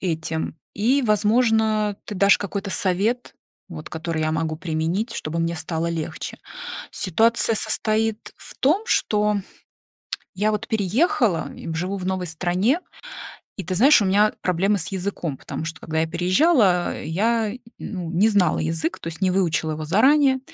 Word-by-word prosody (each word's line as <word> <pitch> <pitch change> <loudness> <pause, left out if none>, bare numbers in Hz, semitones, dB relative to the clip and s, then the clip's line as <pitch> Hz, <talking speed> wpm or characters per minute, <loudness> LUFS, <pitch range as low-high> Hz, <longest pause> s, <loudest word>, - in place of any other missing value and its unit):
этим, 160 -3 -3 0.2
и, 245 +7 +2
возможно, 215 -1 +2
ты 210 - -6
дашь 200 +1 +5
какой-то 200 0 -4
совет, 205 +7 0 0.3
вот, 155 -4 -8
который 160 0 -3
я 155 0 0
могу 160 0 -1
применить, 170 +7 -2
чтобы 155 +2 -4
мне 165 +1 -1
стало 160 +1 -2
легче. 165 -2 -4 0.5
Ситуация 225 +5 +2
состоит 220 0 -1
в - - -12
том, 315 +10 +3
что 210 - +2 1.0
я 210 +3 +1
вот 210 - -2
переехала 220 - +1
и 165 - -6
живу 180 +5 -2
в 185 -2 -5
новой 185 -1 -1
стране, 180 - +1 0.8
и, 195 - -4
ты 185 +2 -3
знаешь, 255 +5 +6
у - - +1
меня 205 +3 +3
проблемы 190 +3 +1
с 160 - -2
языком, 185 -6 -3
потому - - -6 0.2
когда 160 0 -2
я 160 - 0
переезжала, 185 - +2
я, 215 +6 0 0.3
ну, 180 -5 -5
не 185 +6 +3
знала 195 -6 +2
язык, 160 +1 -2
то - - -7
есть 165 +2 -7
не 185 -1 +3
выучила 165 -4 +1
его 155 0 -4
заранее, 265 - +4
190 Hz, 150 wpm, -23 LUFS, 165-220 Hz, 1.0 s, знаешь